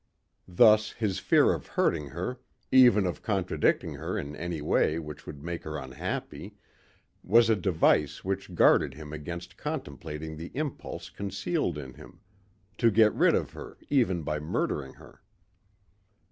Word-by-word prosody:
Thus 105 +4 +5
his 105 -5 -2
fear - - +4
of - - -6
hurting 75 -3 0
her, 90 - -5 0.3
even 120 -6 +6
of 90 -4 -3
contradicting 95 -4 0
her - - -4
in 75 +1 -5
any 85 0 -4
way 75 +1 +1
which 75 -2 -8
would 75 -1 -9
make 85 0 -4
her 75 0 -5
unhappy, 65 -2 -6 0.7
was 115 +3 +4
a - - +4
device 80 -6 +1
which 95 0 -3
guarded 65 - +4
him 75 0 -9
against 85 +3 -7
contemplating 75 +2 -6
the 85 +2 -7
impulse 130 - -5
concealed 100 -6 -2
in 65 -3 -8
him - - -15 0.6
to 115 - +5
get 110 -1 +4
rid - - +4
of - - -1
her - - -10
even 105 - +2
by 75 +1 -2
murdering 75 -2 -2
her. - - -17
85 Hz, 145 wpm, -28 LUFS, 75-105 Hz, 0.7 s, even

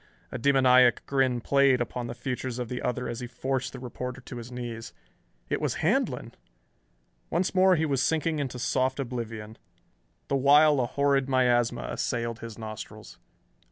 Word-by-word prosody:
A - - -4
demoniac 130 -2 +5
grin 130 -3 +1
played 140 0 +4
upon 120 0 -3
the 120 - -6
features 125 0 -4
of 125 -2 -4
the 125 - -4
other 125 +1 -2
as 120 0 -4
he 125 - -5
forced 130 +2 -2
the - - -8
reporter 125 +1 -6
to 125 -1 -9
his 120 +1 -8
knees. 120 -2 -6 0.5
It - - -2
was - - -1
Handlon.... - - 0 1.0
Once 175 +3 0
more 185 0 +5
he 160 -1 +1
was 135 -4 0
sinking 160 +1 0
into 130 -3 -3
soft 130 +2 0
oblivion, 115 -4 -5 0.7
the 140 - 0
while 145 +2 +5
a 120 - +1
horrid 140 0 +1
miasma 125 -2 +2
assailed 115 -1 -2
his 115 -1 -8
nostrils. 110 -1 -9
125 Hz, 160 wpm, -27 LUFS, 120-135 Hz, 1.0 s, demoniac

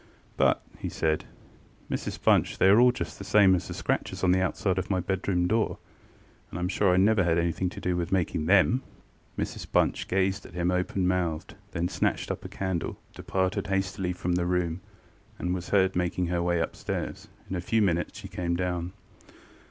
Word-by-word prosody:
ŌĆ£But, - - +5
ŌĆØ - - -24
he - - -3
said, 80 -1 0 0.7
ŌĆ£Mrs - - -4
Bunch, - - +3
they 95 - +5
are 120 +5 +7
just 125 - -6
the - - -6
same 100 -1 +5
as 90 - 0
the - - -6
scratches - - -2
on 90 - +4
the 95 0 +3
outside 95 0 0
of 90 - -4
my 95 -2 +1
bedroom 90 -1 0
door; 110 +2 +1 0.7
and 85 - -6
IŌĆÖm 90 +1 -1
sure 95 0 +3
I 90 - +3
never 100 +1 +4
had 85 -1 +2
anything 85 +2 0
to - - -9
do 90 -1 -1
with 85 +1 -2
making 85 -4 0
them. 100 +7 +4 0.6
ŌĆØ - - -1
Mrs - - -7
Bunch - - +2
gazed 95 +1 0
at 85 - -15
him 90 0 +1
open 90 +1 0
mouthed, 85 -4 -1 0.2
then 85 +1 0
snatched - - -1
up - - -5
a - - -7
candle, 95 -3 -3 0.2
departed 95 +2 -1
hastily 95 -1 -1
from 90 0 -3
the 85 0 +1
room, 90 -1 0 0.6
and 90 0 -1
was 90 -1 -4
heard 95 -2 +3
making 90 0 0
her 85 -1 0
way 85 0 +1
upstairs. 85 - -4 0.2
In 95 - -4
a 90 - -2
few 110 +4 +2
minutes 90 -3 0
she - - -8
came 85 -1 -2
down. 90 0 -2
90 Hz, 200 wpm, -27 LUFS, 85-95 Hz, 0.7 s, are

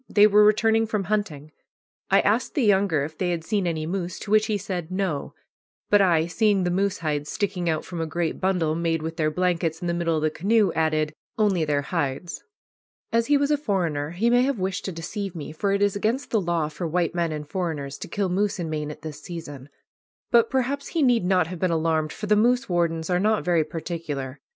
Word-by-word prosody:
They 205 0 +6
were 210 0 +6
returning 220 +1 +3
from 215 -2 -1
hunting. 165 -8 -2 0.6
I - - +5
asked - - 0
the 285 - +2
younger 195 -8 +3
if 155 +2 -6
they 180 - 0
had 170 -2 -2
seen 195 +1 0
any 160 -2 -2
moose, 180 0 -3
to 205 - -6
which 215 0 +4
he 215 - 0
said 180 -4 -4
"No"; 185 -6 -2 0.6
but 205 -1 +6
I, 170 -4 +3
seeing 200 +2 +2
the 175 - 0
moose 195 +2 0
hides 150 -2 -2
sticking 185 -4 -1
out 155 -1 -1
from 175 -2 -5
a 165 - -2
great 165 0 -2
bundle 180 -5 +1
made 165 -1 -1
with 160 +1 -5
their 155 -2 +2
blankets 170 -1 0
in - - -6
the 170 - 0
middle 170 -1 0
of 155 - -1
the 155 - +2
canoe, 205 +2 +2
added, 155 -1 0 0.2
"Only 195 -7 +2
their 145 -1 0
hides." 155 +1 -3 0.7
As 230 0 +2
he 290 0 +4
was 285 +1 +1
a 295 - +3
foreigner, 170 - -1
he 205 +8 +1
may 245 0 +5
have 265 0 +1
wished 190 +1 -3
to 190 - -2
deceive 185 +3 -5
me, 155 -2 -6
for 195 +6 -1
it 200 +1 +2
is 205 -1 +2
against 225 +7 -1
the 220 - +2
law 170 -3 0
for 155 +3 -5
white 170 0 0
men 170 -2 0
and 150 -1 -5
foreigners 150 -5 -4
to - - -6
kill 195 +2 -1
moose 200 +3 0
in 165 -3 -4
Maine 150 -1 -3
at 150 0 -9
this 150 -2 -7
season. 145 -6 -8 0.6
But 235 -1 +5
perhaps 265 +2 -1
he 325 -3 0
need 240 -7 +3
not 180 -2 +3
have 175 +1 -7
been 185 - +1
alarmed, 160 -1 0
for 215 - -6
the 210 0 +3
moose 245 +4 +2
wardens 170 -1 0
are 180 - +2
not 215 +2 +1
very 170 -3 +3
particular. 155 -4 -5
175 Hz, 225 wpm, -24 LUFS, 160-205 Hz, 0.7 s, They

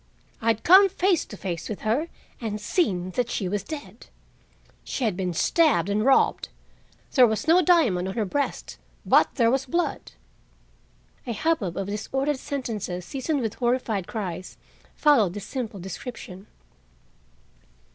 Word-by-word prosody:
I 225 0 +3
bad 225 - -14
come 385 +3 +7
face 370 -2 +1
to 205 - -10
face 175 -3 -5
with 215 - -5
her 235 +10 0 0.3
and 215 -2 -3
seen 190 - 0
that 245 +5 -1
she 195 - -2
was 205 +2 -1
dead. 235 -6 -9 0.8
She 270 - -4
had 215 -6 +1
been 180 -1 -2
stabbed 310 - +2
and 210 +1 +1
robbed. 270 +2 +3 0.6
There 255 -3 +7
was 220 +3 -2
no 340 +3 +6
diamond 275 - +3
on 190 - -5
her 220 -3 0
breast, 280 +9 -3 0.3
but - - +4
there 235 -4 +3
was 270 +1 0
blood." 340 +7 -2 1.1
A 235 - -1
hubbub 220 - -1
of 195 - -2
disordered 270 +8 -2
sentences 215 -11 -4
seasoned 275 - -2
with 225 -2 -2
horrified 240 -6 -1
cries 185 -5 -5 0.4
followed 230 - +3
this 205 - -6
simple 230 -7 -5
description. 190 0 -8
225 Hz, 145 wpm, -25 LUFS, 195-280 Hz, 1.1 s, come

